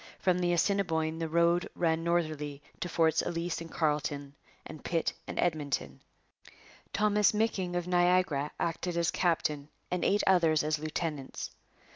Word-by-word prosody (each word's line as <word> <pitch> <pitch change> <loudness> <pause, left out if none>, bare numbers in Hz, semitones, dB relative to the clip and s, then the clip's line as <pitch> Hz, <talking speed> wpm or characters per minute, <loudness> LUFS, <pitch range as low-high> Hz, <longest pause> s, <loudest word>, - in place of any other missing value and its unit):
From 180 -1 +1
the 175 -1 +1
Assiniboine 165 -3 +1
the 165 -1 -2
road 170 +2 +2
ran 165 -1 +1
northerly 155 -4 -1 0.2
to 175 - -3
Forts 160 -1 +3
Ellice 170 0 -3
and 165 - -7
Carlton 150 -3 -1 0.3
and 155 - -10
Pitt 165 -2 0
and - - -6
Edmonton. 150 -6 -1 0.9
Thomas 210 0 +3
M'Micking 195 -5 0
of 175 0 -1
Niagara 175 -5 +2
acted 170 +1 -2
as 170 0 +2
captain 155 -4 0 0.2
and 180 - -1
eight 205 +1 +3
others 165 -5 +4
as 155 0 0
lieutenants. 155 -2 -4
165 Hz, 140 wpm, -30 LUFS, 155-175 Hz, 0.9 s, others